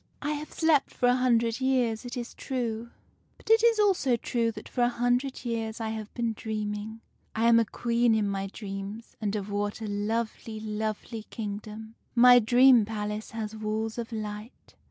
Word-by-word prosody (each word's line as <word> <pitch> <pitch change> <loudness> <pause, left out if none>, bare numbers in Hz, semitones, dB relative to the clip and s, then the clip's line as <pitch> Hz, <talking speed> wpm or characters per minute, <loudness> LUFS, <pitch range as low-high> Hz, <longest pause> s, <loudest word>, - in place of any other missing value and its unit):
"'I 295 - 0
have 300 0 -5
slept 320 -4 +2
for 245 - +3
a 245 - +4
hundred 235 -1 +2
years, 250 -3 +1
it 245 - -6
is 240 0 -5
true; 235 -3 -3 0.5
but - - -4
it 450 0 +6
is 465 -1 +5
also 375 - +3
true 230 0 0
that - - -9
for 250 - -3
a 240 - +4
hundred 245 +2 0
years 225 -1 -3
I 225 -1 -2
have 220 -1 -5
been 235 -2 -1
dreaming. 215 0 -4 0.3
I 225 +1 +2
am 230 0 +6
a 230 - +2
Queen 235 +1 +1
in 215 -2 +1
my 195 0 -2
dreams, 200 +2 -7
and 210 -1 -1
of 205 -1 -4
what 205 +1 -2
a 220 - -5
lovely, 220 +1 -3
lovely 215 +1 -4
kingdom! 215 +1 -6 0.2
My 245 +1 +8
dream 245 +1 +6
palace 210 0 -4
has 220 -1 -5
walls 220 +1 -3
of 235 0 -5
light. 215 +1 -7
225 Hz, 180 wpm, -28 LUFS, 215-245 Hz, 0.5 s, My